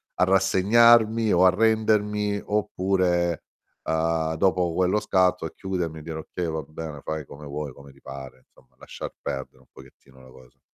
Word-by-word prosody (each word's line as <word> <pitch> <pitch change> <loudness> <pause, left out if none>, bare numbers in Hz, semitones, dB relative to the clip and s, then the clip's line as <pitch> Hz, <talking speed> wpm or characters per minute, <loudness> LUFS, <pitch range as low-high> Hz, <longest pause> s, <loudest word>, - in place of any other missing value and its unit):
a - - +2
rassegnarmi 110 +4 +4
o 90 +1 +5
arrendermi 105 0 +2
oppure, 95 -4 0 0.5
uhm, 80 0 0
dopo 90 0 +1
quello 95 +3 +2
scatto 95 -3 +1
a - - -5
chiudermi, 90 -4 -4
e - - -11
dire: 80 0 -6
"Okay, 85 +3 -5
va 80 - -3
bene, 75 -2 -8
fai 80 -2 -4
come 75 +2 -12
vuoi, 70 -1 -5
come 70 +1 -14
ti 70 - -23
pare", 65 -1 -10
insomma, - - -27
lasciar - - -8
perdere 70 -2 -6
un - - -24
pochettino 65 0 -18
la 65 - -16
cosa. 65 -1 -19
85 Hz, 160 wpm, -25 LUFS, 75-100 Hz, 0.5 s, o